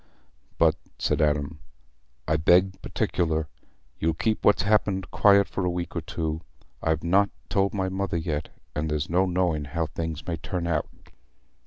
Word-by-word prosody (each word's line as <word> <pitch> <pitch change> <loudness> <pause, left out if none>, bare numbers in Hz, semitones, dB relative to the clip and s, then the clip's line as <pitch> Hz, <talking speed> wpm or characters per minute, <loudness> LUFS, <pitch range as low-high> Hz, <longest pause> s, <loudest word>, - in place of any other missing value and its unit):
"But," - - +4 0.2
said - - 0
Adam, 75 +1 0 0.7
"I 80 - +2
beg 90 +5 +3
particular, 80 -3 -1 0.5
you'll 80 0 +1
keep 110 +5 0
what's 105 -3 +4
happened 100 -3 +1
quiet 100 -1 +5
for 95 - -3
a 90 - +1
week 85 0 -4
or - - -1
two. 80 0 -3 0.4
I've 80 -1 0
not 95 +4 +3 0.2
told 100 +1 +1
my 95 -1 0
mother 95 -1 -2
yet, 80 -2 -3 0.3
and 75 +1 -1
there's 75 +1 -2
no 95 +2 +3
knowing 90 -4 0
how 80 +3 -2
things 80 -1 -5
may 85 -1 -2
turn 85 +2 -4
out." 80 -3 0
85 Hz, 160 wpm, -26 LUFS, 80-95 Hz, 0.7 s, quiet